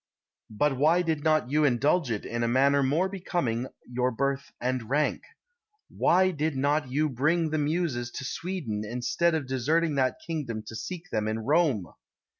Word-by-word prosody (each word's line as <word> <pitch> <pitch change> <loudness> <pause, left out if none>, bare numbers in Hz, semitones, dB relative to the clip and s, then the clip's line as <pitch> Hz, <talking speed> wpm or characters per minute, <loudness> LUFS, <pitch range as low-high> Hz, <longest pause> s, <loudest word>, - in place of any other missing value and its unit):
But 135 +5 0
why 160 +6 +4
did 160 -3 -1
not 155 -5 +2
you 155 +1 +3
indulge 145 +3 +2
it 110 -3 -3
in 120 0 -3
a 115 - +1
manner 140 +3 +3
more 150 +8 +2
becoming 175 -11 -2 0.2
your 125 +1 0
birth 140 +2 -2
and 125 -2 -2
rank? 150 +3 +1 0.7
Why 185 +1 +4
did 155 -2 -1
not 145 +1 +1
you 150 +4 +1
bring 155 +5 +1
the 155 - 0
muses 145 -5 -1
to 140 - -5
Sweden, 150 - -3
instead 125 +9 0
of 155 -3 -2
deserting 150 +6 +1
that 130 -1 +1
kingdom 135 -10 -4
to 110 - -8
seek 180 +8 -7
them 110 -1 0
in 110 0 -1
Rome? 135 - +2
140 Hz, 170 wpm, -27 LUFS, 125-160 Hz, 0.7 s, why